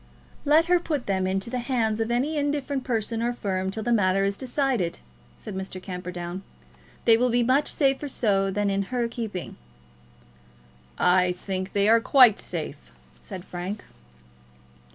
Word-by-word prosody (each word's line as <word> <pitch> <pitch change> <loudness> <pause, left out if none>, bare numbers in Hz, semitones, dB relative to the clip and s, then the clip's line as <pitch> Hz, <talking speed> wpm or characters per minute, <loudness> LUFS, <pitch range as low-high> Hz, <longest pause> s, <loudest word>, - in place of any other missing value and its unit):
"Let 310 +3 +5
her 355 +1 +4
put 300 -6 -3
them 190 -1 0
into 195 +4 -2
the 250 - -1
hands 235 -3 0
of 225 - -1
any 260 +6 0
indifferent 285 -2 -1
person 225 -1 -1
or 240 +1 0
firm 190 -5 -2
till 220 +3 -4
the 240 - +1
matter 195 -2 +3
is 200 0 0
decided," 255 - -1 0.4
said - - -8
Mr. 190 0 -5
Camperdown. 180 -1 -6 0.6
"They 225 -1 +6
will 250 +2 +2
be 240 0 +2
much 265 +5 +2
safer 275 0 +1
so 195 -6 +1
than 200 +1 0
in 195 0 +1
her 245 -2 0
keeping." 220 -6 -6 1.4
"I 180 0 +3
think 185 +1 -5
they 200 0 +3
are 230 +1 +6
quite 245 -4 +6
safe," - - -5 0.3
said 190 -3 -8
Frank. 185 +4 -5
220 Hz, 155 wpm, -25 LUFS, 190-250 Hz, 1.4 s, They